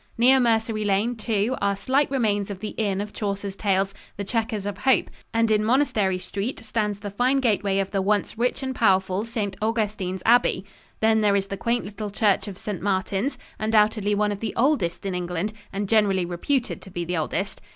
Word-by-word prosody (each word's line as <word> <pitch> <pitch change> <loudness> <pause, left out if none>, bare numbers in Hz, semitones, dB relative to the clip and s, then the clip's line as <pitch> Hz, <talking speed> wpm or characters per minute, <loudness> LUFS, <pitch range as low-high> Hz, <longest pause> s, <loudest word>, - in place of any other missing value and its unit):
Near 255 +3 +6
Mercery 225 -2 +1
Lane, 205 +4 +1
too, 225 +1 0
are 200 0 +2
slight 270 +7 +1
remains 210 -7 0
of 200 -2 -6
the 215 +1 -4
inn 200 -3 -1
of 210 0 -6
Chaucer's 200 -1 -3
Tales, 195 -1 +1 0.2
"The 200 - -3
Chequers 220 0 -2
of 205 -1 -4
Hope," 265 -2 +2 0.2
and 230 0 +2
in 215 0 +3
Monastery 215 -6 +2
Street 195 +6 -4
stands 215 -2 -1
the 205 -1 -5
fine 250 +6 +2
gateway 205 -5 +1
of 195 -1 -1
the 195 -2 0
once 205 +2 0
rich 245 +4 -1
and 265 0 -2
powerful 190 -3 +2
St. 210 -4 -3
Augustine's 210 -4 -1
Abbey. 230 -5 +4 0.4
Then 220 0 +4
there 205 -1 +3
is 195 -1 +1
the 200 - -3
quaint 235 +5 -1
little 210 +1 -5
church 205 0 +1
of 195 -3 -7
St. 200 -3 -5
Martins, 195 +5 -1 0.2
undoubtedly 215 -1 +2
one 210 0 +1
of 205 - -4
the 220 -1 -4
oldest 230 - +1
in 195 - -1
England, 180 +3 -2 0.2
and 200 +1 -3
generally 200 -4 +3
reputed 235 - -1
to - - -12
be 175 -2 -4
the 175 +1 -2
oldest. 190 +5 -2
210 Hz, 195 wpm, -24 LUFS, 195-225 Hz, 0.4 s, Near